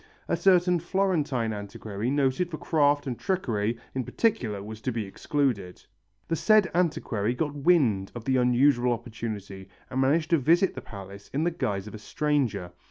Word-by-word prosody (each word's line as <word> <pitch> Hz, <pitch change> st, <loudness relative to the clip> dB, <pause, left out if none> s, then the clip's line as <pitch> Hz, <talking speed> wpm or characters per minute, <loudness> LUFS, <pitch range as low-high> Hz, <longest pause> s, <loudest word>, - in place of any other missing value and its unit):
A -, -, +1 dB
certain 180 Hz, -2 st, +4 dB
Florentine 155 Hz, -, 0 dB
antiquary 105 Hz, +2 st, -5 dB
noted 140 Hz, +5 st, +1 dB
for 155 Hz, -, -5 dB
craft 145 Hz, -3 st, +2 dB
and 125 Hz, -4 st, -4 dB
trickery, 120 Hz, -, -1 dB, 0.2 s
in 130 Hz, -, -2 dB
particular, 120 Hz, -, 0 dB
was 110 Hz, +1 st, -8 dB
to 130 Hz, -, -1 dB
be 115 Hz, -3 st, -3 dB
excluded. 100 Hz, -3 st, -2 dB, 0.4 s
The 165 Hz, -, 0 dB
said 215 Hz, +2 st, +4 dB
antiquary 125 Hz, -, 0 dB
got 145 Hz, +2 st, -2 dB
wind 135 Hz, -, +2 dB
of 120 Hz, -2 st, -7 dB
the 130 Hz, -1 st, +2 dB
unusual 125 Hz, 0 st, +3 dB
opportunity 110 Hz, -5 st, -6 dB, 0.2 s
and 130 Hz, -, 0 dB
managed 155 Hz, +5 st, +2 dB
to 165 Hz, -, +5 dB
visit 170 Hz, +7 st, +3 dB
the 130 Hz, -, -7 dB
palace 100 Hz, -2 st, -10 dB
in 150 Hz, -, +1 dB
the 175 Hz, -, +1 dB
guise 105 Hz, -, -2 dB
of 105 Hz, -, -9 dB
a 110 Hz, -, -7 dB
stranger. 135 Hz, -8 st, -1 dB
130 Hz, 165 wpm, -27 LUFS, 110-160 Hz, 0.4 s, to